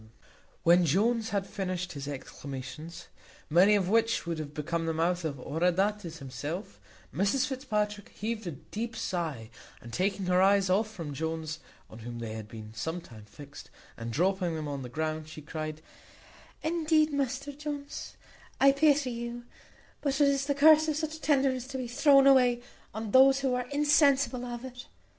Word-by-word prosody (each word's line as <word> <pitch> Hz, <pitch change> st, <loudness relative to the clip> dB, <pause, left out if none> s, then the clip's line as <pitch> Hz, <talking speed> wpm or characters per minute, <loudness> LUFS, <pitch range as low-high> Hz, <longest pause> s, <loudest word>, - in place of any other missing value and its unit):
When 175 Hz, +2 st, +6 dB
Jones 220 Hz, -, +2 dB
had 200 Hz, -1 st, -1 dB
finished 185 Hz, -3 st, -4 dB
his 140 Hz, -1 st, -6 dB
exclamations, 145 Hz, +4 st, -7 dB, 0.5 s
many 190 Hz, +6 st, +6 dB
of 195 Hz, -3 st, +1 dB
which 225 Hz, +2 st, +2 dB
would 170 Hz, -2 st, -3 dB
have 150 Hz, -2 st, -5 dB
become 165 Hz, +2 st, -2 dB
the 160 Hz, -, -1 dB
mouth 175 Hz, +2 st, 0 dB
of 155 Hz, -3 st, -2 dB
Oroöndates 180 Hz, +5 st, 0 dB
himself, 145 Hz, -, -6 dB, 0.3 s
Mrs 200 Hz, +8 st, +2 dB
Fitzpatrick 210 Hz, -7 st, -2 dB
heaved 220 Hz, -1 st, -4 dB
a -, -, -2 dB
deep 225 Hz, -, -6 dB
sigh, 155 Hz, -, -3 dB, 0.3 s
and, 120 Hz, 0 st, -12 dB
taking 195 Hz, +1 st, 0 dB
her 180 Hz, 0 st, +3 dB
eyes 195 Hz, -1 st, +4 dB
off 215 Hz, +4 st, +2 dB
from 165 Hz, -9 st, -7 dB
Jones, 160 Hz, +1 st, -3 dB, 0.3 s
on 110 Hz, -, -12 dB
whom 120 Hz, +1 st, -7 dB
they 115 Hz, -2 st, -5 dB
had 110 Hz, -1 st, -7 dB
been 110 Hz, -1 st, -10 dB
some 160 Hz, +10 st, -3 dB
time 110 Hz, -10 st, -13 dB
fixed, 140 Hz, +5 st, -12 dB, 0.3 s
and 115 Hz, -1 st, -6 dB
dropping 180 Hz, -, +1 dB
them 155 Hz, -1 st, -4 dB
on 140 Hz, -1 st, -4 dB
the 125 Hz, -, -7 dB
ground, 155 Hz, +2 st, -3 dB
she 155 Hz, -, -9 dB
cried, 155 Hz, 0 st, -5 dB, 0.8 s
"Indeed, 315 Hz, -1 st, +2 dB
Mr 280 Hz, 0 st, -2 dB
Jones, 290 Hz, -1 st, -6 dB, 0.4 s
I 275 Hz, -, +7 dB
pity 280 Hz, -2 st, +3 dB
you; 235 Hz, 0 st, -5 dB, 0.6 s
but 280 Hz, -1 st, 0 dB
it 285 Hz, -1 st, +5 dB
is 275 Hz, 0 st, 0 dB
the 285 Hz, -, +1 dB
curse 310 Hz, +2 st, +6 dB
of 310 Hz, -, 0 dB
such 315 Hz, +1 st, -4 dB
tenderness 265 Hz, -4 st, +1 dB
to 270 Hz, -1 st, -5 dB
be 255 Hz, -2 st, -4 dB
thrown 275 Hz, +2 st, +5 dB
away 250 Hz, -3 st, +5 dB, 0.3 s
on 220 Hz, 0 st, -5 dB
those 270 Hz, +2 st, +6 dB
who 265 Hz, -2 st, +1 dB
are 250 Hz, 0 st, -2 dB
insensible 280 Hz, -3 st, +3 dB
of 240 Hz, +1 st, -6 dB
it. 250 Hz, -1 st, -9 dB
200 Hz, 170 wpm, -29 LUFS, 160-265 Hz, 0.8 s, I